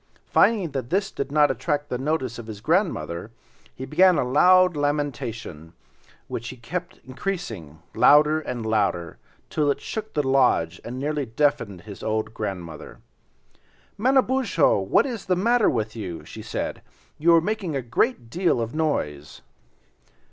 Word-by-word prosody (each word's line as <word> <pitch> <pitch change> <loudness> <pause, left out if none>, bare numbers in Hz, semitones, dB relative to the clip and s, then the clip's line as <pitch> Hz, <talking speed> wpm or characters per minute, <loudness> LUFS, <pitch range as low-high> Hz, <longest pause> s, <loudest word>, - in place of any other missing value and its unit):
Finding 200 -9 +3
that 130 -3 -4
this 195 +2 0
did 140 0 -4
not 150 0 +4
attract 145 -2 -2
the 125 - -2
notice 130 -4 -2
of 115 - -9
his 105 -2 -7
grandmother, 155 - -1 0.5
he 130 - -6
began 180 +4 +4
a - - +2
loud 180 +6 +5
lamentation, 120 - -3 0.5
which 115 0 -5
he 130 - -9
kept 180 +9 -6
increasing, 130 - -5 0.2
louder 150 +6 +5
and 120 -7 -5
louder, 100 -7 -1 0.3
till 150 -2 +1
it 140 0 0
shook 215 +7 -6
the 145 -3 0
lodge 125 -11 +2
and 120 +2 -6
nearly 145 0 -2
deafened 115 - 0
the 100 -3 -10
old 110 0 -2
grandmother. 95 -7 -6 1.0
"Manabozho, 260 - +2
what - - +2
is 240 -6 -5
the 185 - +3
matter 230 +4 +3
with 110 -3 -2
you?" 95 -7 -6
she - - -9
said, - - -4 0.4
"you 170 +2 +5
are - - +7
making 185 -3 -2
a 135 - -2
great 120 - -1
deal 175 -6 +1
of 115 0 -3
noise." 75 - -2
140 Hz, 150 wpm, -24 LUFS, 110-175 Hz, 1.0 s, are